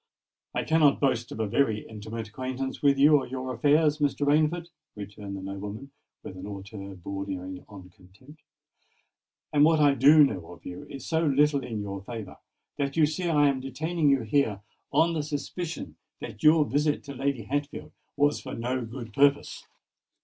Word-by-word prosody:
"I - - 0
cannot 155 -3 +3
boast 125 -4 0
of - - -7
a 110 - +1
very 110 0 0
intimate 110 +1 -7
acquaintance 130 +3 -5
with 140 -1 +4
you 145 +2 +6
or 135 - -3
your 130 0 -4
affairs, 150 +4 +3
Mr. 145 0 0
Rainford," 155 +4 +2 0.3
returned 100 -1 -7
the 95 - -8
nobleman 100 +7 -7 0.3
with 95 - -8
a 95 - -9
hauteur 100 0 -8
bordering 95 0 -6
on 95 -3 -12
contempt; 100 - -19 1.1
"and 145 -1 +5
what 160 0 +5
I 145 -2 +5
do 150 +3 +7
know 90 -11 -2
of 85 - -17
you 90 - -8
is 135 -1 -8
so 160 0 0
little 145 -1 +3
in 110 -4 -4
your 100 -1 -5
favour 110 -2 -8 0.4
that 140 +1 -2
you 160 - +6
see 165 +4 -2
I 145 -3 +4
am 135 -2 +1
detaining 150 +4 -1
you 135 -2 +3
here 110 -4 +1 0.3
on 170 +1 +3
the 160 - -1
suspicion 150 +3 -5 0.2
that 105 - -8
your 155 0 +6
visit 150 +1 0
to 140 - -8
Lady 135 -2 -2
Hatfield 145 +6 -4 0.3
was 145 +1 +2
for - - -7
no 125 +2 -2
good 115 -1 -8
purpose. 140 +2 +2
135 Hz, 175 wpm, -27 LUFS, 105-145 Hz, 1.1 s, do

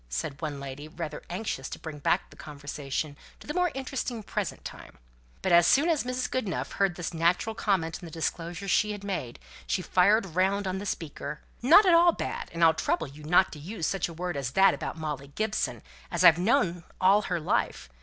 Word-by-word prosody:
said 135 - -4
one 150 -3 -3
lady, 140 +2 -7
rather 160 0 -6
anxious 180 -8 -3
to - - -6
bring 155 -2 -8
back - - 0
the - - -14
conversation 145 0 -5 0.2
to - - -14
the 300 - -4
more 360 +1 +2
interesting 260 -4 -4
present - - -4
time. - - -9 0.5
But - - +1
as 170 0 +7
soon 295 +5 +4
as 320 -3 +2
Mrs. 255 +1 -2
Goodenough 220 -8 -2
heard 195 -3 +1
this 175 -1 -4
natural 170 +6 +1
comment 185 -7 0
on 175 - -8
the - - -11
disclosures 170 +4 -3
she 210 +3 +2
had 205 -1 -8
made, 180 -12 -4 0.3
she 185 - 0
fired 190 0 +3
round 195 +2 +2
on 190 0 -2
the 205 - -5
speaker: 150 -3 -5 0.2
"Not 325 - +7
at 360 - +5
all 340 0 +6
bad, - - -4
and 170 0 -1
I'll 165 -1 +7
trouble 160 0 -1
you 145 +2 -12
not 175 +5 +4
to 150 - -9
use 170 +3 -4
such 195 -2 -1
a - - -8
word 175 +1 -4
as 135 -2 -3
that 195 0 +6
about - - -5
Molly 150 -3 -4
Gibson, 215 0 -1 0.3
as 175 0 0
I've 170 -1 +8
known 180 -5 +2 0.2
all 195 +3 +5
her 175 -2 0
life. 155 - -1
175 Hz, 210 wpm, -28 LUFS, 155-205 Hz, 0.5 s, I've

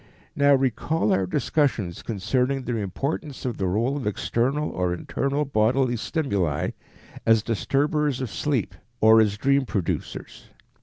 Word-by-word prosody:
_ - - -27 0.3
Now 140 0 +5
recall 135 -1 +1
our 95 -1 +1
discussions 125 - 0
concerning 125 +5 -1
the 120 -1 -2
importance 135 - -4
of 120 -3 -2
the 95 - -1
role 115 +9 0
of 135 -6 -3
external 130 +8 0
or 90 -1 -1
internal 140 - -1
bodily 125 +1 +2
stimuli 100 - -1 0.5
as 115 -2 +4
disturbers 140 - 0
of 130 -5 -4
sleep, 120 -6 -1 0.3
or 110 +1 +7
as 105 -2 +1
dream 140 +4 +2
producers. 105 -8 -4
125 Hz, 140 wpm, -24 LUFS, 105-140 Hz, 0.5 s, or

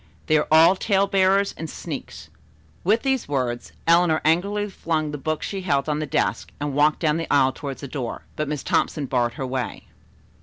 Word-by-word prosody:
They 155 - +2
are - - -2
all 160 +4 +7
tale 195 0 +2
bearers 195 0 +2
and 160 0 -6
sneaks." - - -7 0.5
With 215 +6 +2
these 265 -2 0
words, 125 -4 -2
Eleanor 165 -1 +4
angrily 200 +6 +1
flung 160 -5 -2
the 150 - -4
book 155 +3 -2
she 195 -1 -4
held 140 -6 0
on 150 0 0
the 155 - -3
desk - - -1
and 145 -1 -3
walked 150 +2 +3
down 155 -1 +2
the 165 - -4
aisle 135 -2 +4
toward 135 0 -6
the 140 - -7
door, 125 -3 -5
but 155 - -2
Miss 150 -1 -3
Thompson 150 - 0
barred 120 -2 0
her 135 - -4
way. 130 -2 -4
155 Hz, 195 wpm, -23 LUFS, 140-185 Hz, 0.5 s, all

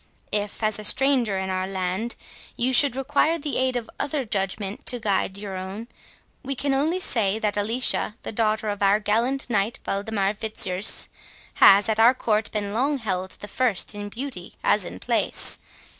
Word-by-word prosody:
If, 205 +1 -2
as 215 0 +2
a - - -6
stranger 250 -3 +2
in 190 0 -2
our 185 0 -1
land, 190 +4 -2 0.4
you 255 +2 +1
should 275 0 +4
require 300 +5 +1
the 295 -2 -3
aid 260 -1 +1
of 240 -2 -3
other 285 -2 -1
judgment 195 0 -2
to 245 - 0
guide 200 -2 0
your 200 -2 -6
own, 190 +5 -6 0.5
we 275 0 -4
can 280 +2 0
only 310 +7 +1
say 220 - 0
that 210 -2 -1
Alicia, 215 +1 +1
the - - -4
daughter 215 -1 0
of 205 0 -4
our 200 +1 +4
gallant 230 +6 0
knight 215 -1 0
Waldemar 200 0 -1
Fitzurse, 205 -2 +1 0.5
has 200 +2 +8
at 220 0 0
our 235 +3 +6
court 220 -3 0
been 205 -2 -3
long 275 +6 +1
held 190 -5 -3
the 205 - -6
first 225 -3 0
in 205 0 -6
beauty 265 +6 -6
as - - +3
in - - -7
place. - - 0
215 Hz, 175 wpm, -24 LUFS, 200-250 Hz, 0.5 s, has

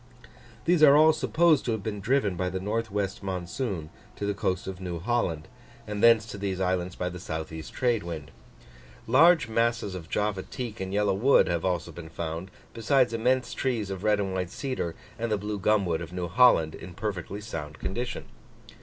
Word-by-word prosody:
These 175 -1 +3
are 145 -1 +8
all 155 +1 +7
supposed 160 -1 +3
to 115 - 0
have 110 -3 -4
been 105 -1 -3
driven 110 -3 +1
by 90 +1 -1
the 95 - -3
N. 95 - -6
W. 105 -2 -1
monsoon 90 - -4 0.2
to 100 - -4
the 100 - 0
coast 95 -2 -1
of 95 -1 -6
New 90 -2 -4
Holland, 85 -5 -1 0.4
and 105 -1 -4
thence 115 -2 +6
to 105 -3 -8
these 95 -2 -2
islands 90 -1 -1
by 90 - -2
the 90 0 -5
S. 80 -2 -5
E. 80 0 -6
trade 120 +6 0
wind. 80 -5 -7 0.7
Large 165 +7 +5
masses 115 -2 0
of 85 -3 -8
Java 105 -2 0
teak 120 0 -6
and 95 0 -4
Yellow 100 0 +2
wood 120 +9 +4
have 85 -2 -1
also 85 -2 -1
been 80 0 -9
found, 80 +3 -5 0.2
besides 120 +2 +2
immense 125 +2 +1
trees 115 -7 -1
of 95 0 -5
red 105 -1 +3
and 95 -2 -2
white 90 -2 -2
cedar, 130 - -3 0.2
and 115 -1 -2
the 105 - +2
blue 105 +1 -4
gumwood 95 -5 +2
of 85 - -7
New 90 -1 -3
Holland, 85 -5 +5
in - - -9
a - - -12
perfectly 100 -1 -4
sound 80 -8 -6
condition. 120 +5 -4
100 Hz, 200 wpm, -27 LUFS, 90-115 Hz, 0.7 s, are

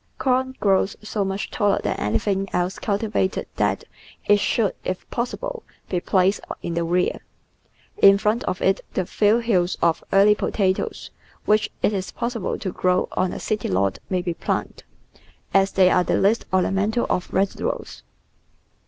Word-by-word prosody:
Corn 260 0 0
grows 195 -1 +2
so 215 -1 -2
much 195 +1 -3
taller 205 -3 +1
than - - -1
anything 190 - -1
else 180 +3 -1
cultivated 205 -2 -1
that - - 0 0.4
it 205 0 +5
should, 210 0 +1
if 185 0 -4
possible, 485 - -3 0.3
be 180 - 0
placed 190 +2 +2 0.2
in 170 - -3
the 170 0 0
rear. 175 +2 0 0.8
In 195 0 +8
front 215 +4 0
of 185 - -3
it 195 +1 +2
the 185 - 0
few 210 +4 +3
hills 195 -7 +1
of 170 -1 +1
early 200 +2 +6
potatoes 190 -2 -1 0.3
which 215 0 +3
it 210 - +3
is 190 -2 -3
possible 235 -3 -3
to 190 - -4
grow 185 0 +1
on 185 - 0
a - - -5
city 215 -2 -2
lot 95 +1 0
may 185 -2 0
be 175 -2 -2
planted, - - -3 0.7
as 195 0 +4
they 185 -1 +5
are 180 - +4
the - - +1
least 210 +4 +2
ornamental 195 +5 +1
of 180 - -1
vegetables. 195 +1 -2
195 Hz, 160 wpm, -23 LUFS, 185-210 Hz, 0.8 s, In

